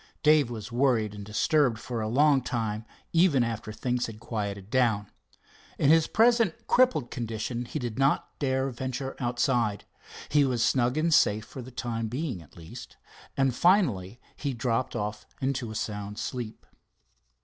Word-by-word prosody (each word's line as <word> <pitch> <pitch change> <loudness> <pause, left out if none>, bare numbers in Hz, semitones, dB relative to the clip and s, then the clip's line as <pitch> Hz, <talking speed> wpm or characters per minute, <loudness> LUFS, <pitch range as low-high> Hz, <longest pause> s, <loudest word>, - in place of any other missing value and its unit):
Dave 150 -4 +5
was 110 -1 -7
worried 120 -4 +2
and 105 -1 -8
disturbed 120 - +2
for 115 +1 -4
a 110 - -2
long 140 +4 +4
time, 110 -3 -3 0.3
even 165 -7 +4
after 115 -2 -4
things 125 +2 -1
had 110 -2 -9
quieted 100 -3 -4
down. 115 -6 +1 0.7
In 145 - +4
his 165 -1 +5
present 230 -5 +3
crippled 250 - +3
condition 115 +1 -3
he 120 - -5
did 120 -3 -4
not 135 +1 +1
dare 130 -1 0
venture 130 +2 -4
outside. 120 -4 0 0.4
He 145 -1 +4
was 125 -4 +1
snug 125 +1 +2
and 165 +1 +2
safe 105 -4 +3
for 130 - -9
the 125 - -9
time 115 -2 -3
being 125 - -3
at 80 - -18
least, 80 -1 -11 0.4
and 135 -2 +2
finally 120 - +2 0.2
he 140 -4 -3
dropped 115 +2 -1
off 105 -1 -4
into 130 -3 -2
a 110 - -7
sound 105 -2 -4
sleep. 120 -2 -5
120 Hz, 160 wpm, -28 LUFS, 110-135 Hz, 0.7 s, Dave